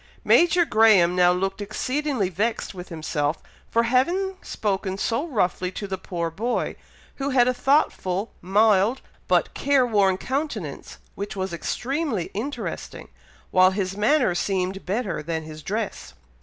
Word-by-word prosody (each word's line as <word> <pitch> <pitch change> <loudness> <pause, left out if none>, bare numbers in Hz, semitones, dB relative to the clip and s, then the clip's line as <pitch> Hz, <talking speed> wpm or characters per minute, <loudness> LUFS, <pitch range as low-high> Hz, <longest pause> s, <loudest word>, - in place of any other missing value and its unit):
Major 345 0 +5
Graham 210 - +5
now 180 -1 +5
looked 195 +2 -2
exceedingly 255 +1 -1
vexed 215 +6 -2
with 180 -1 -9
himself, 155 -2 -2 0.3
for 230 - +2
having 345 +11 +1
spoken 195 -2 -2
so 230 +10 -1
roughly 185 - 0
to 205 - -5
the 190 -2 -4
poor 170 -3 -3
boy, 230 +9 -2 0.4
who 275 0 -2
had 250 -3 +4
a 255 - +3
thoughtful, 230 -7 +1
mild, 210 +5 +3 0.3
but - - +2
care 280 -2 +3
worn 200 -5 +2
countenance, 245 - -4 0.2
which 200 +1 -5
was 190 -2 -3
extremely 250 - -2
interesting, 260 +8 -5 0.4
while 185 0 +6
his 190 -1 -2
manner 230 0 +3
seemed 190 +1 -2
better 200 -4 -1
than 160 +1 -3
his 155 0 -9
dress. 215 +7 -4
205 Hz, 140 wpm, -24 LUFS, 185-250 Hz, 0.4 s, while